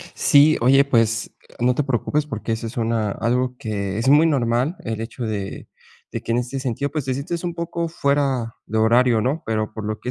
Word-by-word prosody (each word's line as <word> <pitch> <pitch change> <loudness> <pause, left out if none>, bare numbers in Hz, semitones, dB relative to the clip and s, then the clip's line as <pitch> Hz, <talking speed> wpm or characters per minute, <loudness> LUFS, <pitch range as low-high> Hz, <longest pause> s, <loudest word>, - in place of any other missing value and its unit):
Sí, 145 +2 +5
oye, 135 +4 +5
pues 115 -4 +1 0.2
no 125 +1 +2
te 150 - +1
preocupes 145 +3 0
porque 115 -3 -4
eso 110 +1 -3
es 115 +4 -8
una 115 -3 0
algo 125 +2 -1
que 100 -3 -3
es 115 - 0
muy 150 +3 +6
normal, 130 +2 +1
el 110 -1 -3
hecho 115 +2 -5
de 105 -3 -5 0.4
de - - -4
que 115 - -3
en - - +2
este 125 +2 -2
sentido, 135 +2 -2
pues 150 -4 -3
te 130 - 0
sientes 160 +6 -4
un 175 -1 -3
poco 170 0 -3
fuera 140 -6 0
de 110 - -4
horario, 115 +1 +4
¿no? 140 +7 -1
Pero 110 -1 -1
por 110 -1 -6
lo 110 0 -3
que 125 - -5
125 Hz, 215 wpm, -22 LUFS, 115-140 Hz, 0.4 s, muy